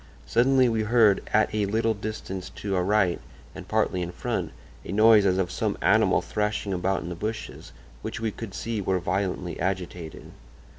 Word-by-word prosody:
Suddenly 130 +2 +4
we 115 -2 +1
heard, 110 -2 +4
at 110 0 +2
a 105 -2 0
little 110 +2 +1
distance 100 -3 -6
to 100 -2 -3
our 90 - +1
right 100 -2 +2 0.3
and - - -10
partly 90 - 0
in 90 0 -3
front, - - -3 0.3
a - - -7
noise 110 0 +6
as 90 -1 +2
of 95 -2 0
some - - -1
animal - - +3
thrashing 105 -1 -2
about 95 +1 -1
in 85 - -6
the - - -4
bushes, 110 +5 -6 0.3
which - - -5
we 110 -1 -1
could 105 -2 -8
see 115 -2 -3
were 95 -1 0
violently 90 -1 -2
agitated. 90 -2 -4
100 Hz, 180 wpm, -26 LUFS, 95-110 Hz, 0.3 s, noise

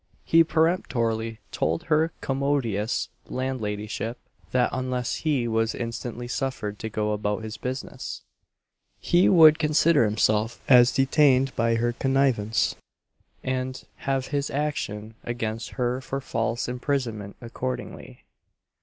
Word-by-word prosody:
He 165 0 +6
peremptorily 115 - 0
told 80 +2 -1
her 160 +1 +2
commodious 135 -6 0 0.2
landladyship, 115 -3 -3 0.3
that 125 -1 +2
unless 130 -1 -2
he 140 -7 0
was 115 0 0
instantly 120 +1 -5
suffered 120 -6 -3
to 110 - -4
go 105 0 -1
about 105 +1 -1
his 110 0 -5
business, 130 +1 -5 0.8
he 175 +2 +4
would 160 -4 +7
consider 155 -3 +4
himself 105 +1 +1
as 125 -2 +7
detained 135 -1 +3
by 115 0 +2
her 120 +1 0
connivance, 130 -5 +1 0.7
and 130 -1 -3
have 135 -1 -2
his 145 -1 -1
action 115 -7 -3
against 115 -1 -3
her 125 0 0
for 135 +1 -4
false 115 -1 -2
imprisonment 125 -5 -2
accordingly. 125 +2 -6
125 Hz, 115 wpm, -25 LUFS, 110-135 Hz, 0.8 s, would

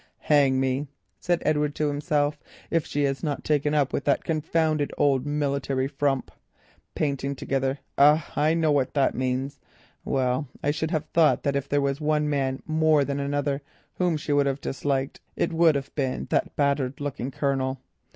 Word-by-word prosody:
"Hang 140 -3 +3
me," 135 +2 0 0.3
said 175 -1 0
Edward 150 -1 +1
to 150 - 0
himself, 145 0 0 0.3
"if 165 -3 +1
she 145 - -1
has 135 -1 0
not 150 -4 -3
taken 150 0 +1
up 145 -2 +1
with - - -1
that 140 - +2
confounded 155 -1 0
old 140 -1 +2
military 140 -2 -1
frump. 135 -1 -1 0.6
Painting 140 -1 -1
together! 135 +1 -1 0.2
Ah, 150 +3 +5
I 155 +2 +2
know 160 -2 +2
what 140 -2 +1
that 140 -2 +3
means. 130 +2 -2 0.4
Well, 130 +1 0 0.2
I 145 - +2
should 155 +1 -2
have 155 -3 -1
thought 165 -2 +4
that 140 -1 0
if 140 0 -2
there 145 0 +2
was 140 +1 -1
one 150 0 +1
man 135 -2 -1
more 155 -2 +3
than 140 0 -2
another 140 0 -1 0.3
whom 175 -3 0
she 145 0 -2
would 145 -1 +3
have 135 0 -1
disliked, 135 0 -2
it - - -1
would 165 -2 +4
have 135 -1 -4
been 135 -3 -2
that - - 0
battered 140 -2 0
looking 140 -3 -3
Colonel." 135 -1 -1
145 Hz, 175 wpm, -25 LUFS, 135-150 Hz, 0.6 s, Ah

